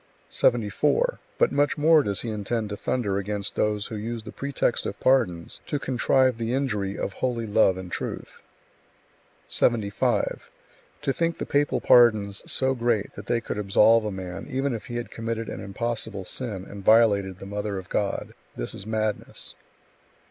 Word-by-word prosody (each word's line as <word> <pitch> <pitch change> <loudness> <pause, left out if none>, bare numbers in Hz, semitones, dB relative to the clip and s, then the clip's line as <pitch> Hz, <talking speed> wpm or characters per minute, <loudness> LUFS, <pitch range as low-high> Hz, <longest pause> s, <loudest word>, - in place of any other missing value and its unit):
74. - - +2 0.2
But - - +3
much 145 +1 +1
more 155 +1 +6
does 100 -7 -1
he 115 - -4
intend 110 +1 -2
to - - -2
thunder 100 -3 -1
against 100 0 -3
those 105 -1 0
who 110 - -6
use 115 +2 -4
the 110 - -8
pretext 140 -3 -1
of 100 - -6
pardons 105 -11 +1
to 145 - -1
contrive 130 -2 +2
the 115 +2 -1
injury 105 -8 -1
of 100 - -3
holy 120 -1 -2
love 105 -3 +3
and 90 -1 -7
truth. - - -5 1.1
75. 110 -4 +1 0.5
To 135 - +1
think 165 +2 0
the - - -4
papal 145 0 +1
pardons 110 -5 +5
so 130 0 +2
great 120 -4 0
that - - -10
they 115 - +1
could 105 - -4
absolve 105 +3 +5
a 105 - -2
man 95 -1 -6
even 135 +1 -1
if 115 - -6
he 120 - -6
had 120 -3 -4
committed 115 0 -4
an - - -6
impossible 105 -1 -4
sin 105 -4 -3
and 100 -1 -9
violated 100 -4 +4
the 95 - -10
Mother 105 0 -3
of 95 -1 -7
God 100 -1 -2 0.2
this - - -4
is 100 - -8
madness. 110 -1 -2
110 Hz, 170 wpm, -25 LUFS, 100-125 Hz, 1.1 s, more